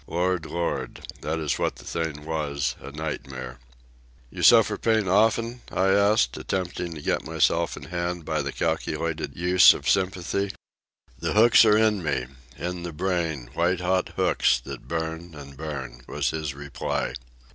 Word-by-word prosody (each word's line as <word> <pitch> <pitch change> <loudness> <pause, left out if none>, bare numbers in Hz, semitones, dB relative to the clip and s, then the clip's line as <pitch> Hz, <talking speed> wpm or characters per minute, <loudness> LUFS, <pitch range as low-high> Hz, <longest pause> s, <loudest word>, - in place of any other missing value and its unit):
Lord, 90 -1 0
Lord! 85 0 -3 0.2
that 80 +2 -2
is 75 -3 -1
what - - 0
the - - -13
thing 80 -3 -3
was, 75 -3 -2
a 70 - -8
nightmare. 65 -4 -6 0.7
"You - - -7
suffer - - +6
pain 110 -3 +1
often?" 115 +5 +2
I 95 +1 +2
asked, 100 - +3
attempting 90 -2 -3
to 75 - -9
get - - 0
myself 80 +1 +1
in 75 - -9
hand 85 +1 -3
by 80 -1 0
the 70 0 -3
calculated 80 +1 -2
use 90 +1 +7
of - - -7
sympathy. 95 +1 0 0.7
"The - - -1
hooks 115 +2 +7
are 105 -1 +5
in 110 -3 +3
me, 70 -6 -1 0.3
in 90 0 -4
the 85 -1 -6
brain, 80 -7 -2
white 85 +3 +1
hot 90 0 0
hooks - - +2
that - - -9
burn 80 0 -4
an' 70 -1 -10
burn," 70 -4 -6
was - - -1
his 75 -3 -4
reply. 70 -2 -3
85 Hz, 155 wpm, -25 LUFS, 75-95 Hz, 0.7 s, use